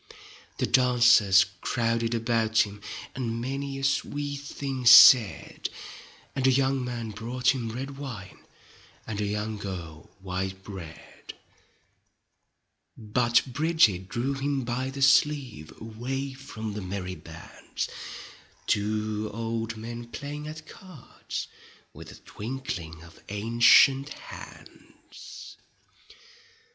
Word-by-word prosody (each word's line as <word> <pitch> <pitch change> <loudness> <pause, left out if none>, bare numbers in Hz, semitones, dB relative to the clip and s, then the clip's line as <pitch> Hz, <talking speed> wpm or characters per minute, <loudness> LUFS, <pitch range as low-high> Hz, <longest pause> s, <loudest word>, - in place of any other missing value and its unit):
The - - 0
dancers 120 -6 +5 0.2
crowded 115 -1 0
about 115 -1 +2
him, 105 0 -11 0.3
And 115 -3 -3
many 135 +2 -4
a 135 - -6
sweet 145 +1 -1
thing 140 -2 -5
said, 115 -2 +7 0.7
And 130 -1 +1
a - - +6
young 135 0 +1
man 120 -3 -4
brought 125 +5 0
him 120 -4 -4
red 135 +4 -6
wine 115 -9 -8 0.7
And 105 -2 -4
a - - 0
young 105 +1 -3
girl 85 -6 -7
white 95 0 -4
bread. 85 -6 -10 1.6
But 120 +2 +2
Bridget 125 - +2
drew 125 +5 -1
him 135 0 -1
by 125 +2 -2
the 135 0 -3
sleeve. 135 - +2
Away 130 +5 -5
from 115 -5 -7
the 105 - -5
merry 95 0 -5
bands. 80 -3 -7 0.9
To 105 +1 -2
old 115 0 -3
men 120 +2 -7
playing 145 +4 -7
at 155 +1 -8
cards 180 - -8 0.5
With - - -11
a - - -12
twinkling 100 -9 -6
of 85 0 -16
ancient 120 +6 +5
hands. - - -12
115 Hz, 110 wpm, -27 LUFS, 105-135 Hz, 1.6 s, said